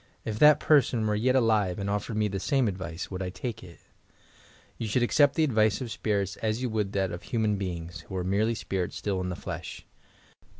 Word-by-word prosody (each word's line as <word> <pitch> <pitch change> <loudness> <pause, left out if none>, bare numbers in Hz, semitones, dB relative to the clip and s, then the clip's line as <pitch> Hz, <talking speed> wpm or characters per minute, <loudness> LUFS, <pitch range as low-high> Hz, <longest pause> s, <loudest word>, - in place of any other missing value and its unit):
If 110 -1 -3
that 150 0 +7
person 130 -8 +3
were 105 - +1
yet 125 +5 +2
alive 110 -7 +2
and 100 - -3
offered 105 +2 -2
me 105 -1 +2
the 100 -1 -3
same 135 +4 +1
advice, 90 -3 -5
would 95 0 -4
I 95 - -2
take 115 +5 -5
itf" 85 -2 -13 1.0
You 115 - -2
should 120 +4 +1
accept 145 +3 +4
the 160 - +3
advice 110 -7 +2
of 125 -4 -5
spirits 100 -3 -1
as 110 0 -1
you 125 -2 -2
wonid 105 -3 -1
that 95 -2 0
of 85 - -6
human 110 -4 0
beings, 85 -3 -5
who 95 - -6
are 90 - -1
merely 105 +5 +1
spirits 95 -4 -3
still 95 -3 -2
in 90 - -3
the 90 - -3
6esh. - - -7
105 Hz, 215 wpm, -28 LUFS, 95-115 Hz, 1.0 s, that